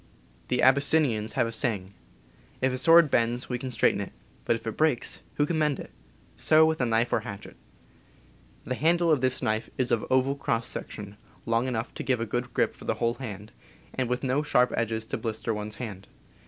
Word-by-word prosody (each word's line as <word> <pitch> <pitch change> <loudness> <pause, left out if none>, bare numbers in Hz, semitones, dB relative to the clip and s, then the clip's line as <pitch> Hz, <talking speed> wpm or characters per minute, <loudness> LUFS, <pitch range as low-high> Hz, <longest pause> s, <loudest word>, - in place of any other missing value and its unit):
The 125 -1 0
Abyssinians 135 -4 +3
have - - +2
a 115 - -3
saying, 105 -5 -2 0.7
"If 130 0 +1
a - - -1
sword 165 0 +6
bends, 120 +1 +1
we 125 -1 -2
can 130 - -5
straighten 110 -4 +2
it; 100 - -6 0.3
but 115 - +2
if 115 - -8
it 115 - -3
breaks, 155 -6 +1
who 145 - +2
can 160 +1 -1
mend 150 -2 +1
it? - - -9 0.3
" - - -31
So 155 0 +7
with 160 -2 0
a 125 - +2
knife 115 +1 +1
or - - +3
hatchet. 100 -3 -9 1.1
The - - -9
PERSONAL - - +3
KITS - - -6
29 - - -13
handle 170 -1 +3
of 145 -5 +3
this 130 -1 0
knife 110 +1 -1
is 130 -2 0
of 115 - +2
oval 130 +1 +2
cross 115 -4 -1
section, 105 -1 -7 0.3
long 115 +2 +1
enough 120 -1 -3
to - - -6
give 130 -3 0
a 115 - -1
good 120 +3 -3
grip - - +1
for - - -14
the - - 0
whole 115 0 0
hand, 105 -5 -8 0.4
and 130 -2 -2
with 125 +2 -1
no 135 +2 +1
sharp 125 -4 +2
edges 110 -1 -1
to - - -4
blister 115 0 -2
one's 105 0 -5
hand. 100 -5 -7
120 Hz, 220 wpm, -27 LUFS, 110-135 Hz, 1.1 s, So